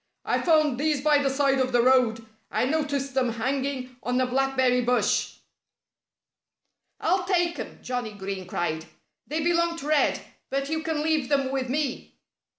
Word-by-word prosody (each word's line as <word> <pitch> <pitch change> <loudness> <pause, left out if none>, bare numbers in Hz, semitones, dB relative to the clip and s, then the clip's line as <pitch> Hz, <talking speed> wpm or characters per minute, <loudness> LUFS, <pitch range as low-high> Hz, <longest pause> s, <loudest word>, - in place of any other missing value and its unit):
"I - - +1
found 310 -6 +3
these 300 -1 +1
by 295 0 +4
the 275 - +1
side 270 0 +2
of 255 0 +1
the 240 -1 +3
road. 240 -3 +3 0.2
I 220 +3 0
noticed 285 -2 -1
them 255 -3 +1
hanging 260 +1 -3
on 250 +1 0
a 255 - +3
blackberry 260 -1 +2
bush." 245 +1 +1 1.6
"I'll 360 +2 +1
take 350 -2 +1
'em!" - - -7
Johnnie 245 -4 -3
Green 195 -2 -6
cried. 160 -3 -2 0.4
"They 310 +2 -2
belong 340 0 +1
to 290 - -7
Red. 305 -1 +2 0.3
But 275 +1 -2
you 315 0 -1
can 315 -1 -2
leave 310 -4 0
them 275 -2 +1
with 265 -2 -2
me." 280 -1 -2
270 Hz, 160 wpm, -26 LUFS, 250-305 Hz, 1.6 s, by